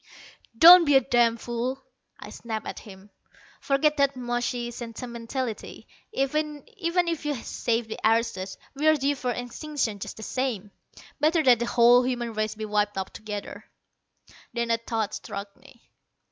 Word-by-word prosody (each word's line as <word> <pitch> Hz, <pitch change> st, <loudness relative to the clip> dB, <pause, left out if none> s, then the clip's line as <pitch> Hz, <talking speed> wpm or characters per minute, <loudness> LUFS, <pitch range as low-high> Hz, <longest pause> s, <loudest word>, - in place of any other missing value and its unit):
"Don't 345 Hz, +5 st, +10 dB
be 290 Hz, -2 st, +4 dB
a 270 Hz, -, +7 dB
damn 240 Hz, -2 st, +2 dB
fool," 240 Hz, +3 st, -3 dB, 0.4 s
I -, -, -10 dB
snapped 220 Hz, -2 st, -5 dB
at -, -, -6 dB
him. 200 Hz, -1 st, -14 dB, 0.5 s
"Forget 300 Hz, +2 st, +1 dB
that 280 Hz, -1 st, +2 dB
mushy 240 Hz, -1 st, -2 dB
sentimentality. 235 Hz, 0 st, -6 dB, 0.2 s
Even 300 Hz, -2 st, -1 dB
if 345 Hz, -6 st, -1 dB
you 295 Hz, -1 st, -1 dB
save 230 Hz, -1 st, -2 dB
the 220 Hz, -, -6 dB
aristos, 220 Hz, -4 st, 0 dB, 0.2 s
we're 310 Hz, +2 st, +3 dB
due 285 Hz, 0 st, +1 dB
for 255 Hz, -2 st, -4 dB
extinction 245 Hz, -1 st, -3 dB
just -, -, -7 dB
the 220 Hz, -, -8 dB
same. 225 Hz, -5 st, -3 dB, 0.5 s
Better 315 Hz, +2 st, +3 dB
that 245 Hz, -4 st, +5 dB
the 235 Hz, -, -1 dB
whole 240 Hz, +1 st, +6 dB
human 245 Hz, -2 st, -2 dB
race 215 Hz, 0 st, -2 dB
be 215 Hz, 0 st, -5 dB
wiped 210 Hz, -1 st, 0 dB
out 190 Hz, -1 st, -4 dB
together." 210 Hz, -2 st, -7 dB, 0.9 s
Then 235 Hz, -1 st, -1 dB
a 230 Hz, -, +3 dB
thought 225 Hz, -2 st, -3 dB
struck 200 Hz, 0 st, -7 dB
me. 260 Hz, -3 st, -20 dB
240 Hz, 150 wpm, -26 LUFS, 225-275 Hz, 0.9 s, Don't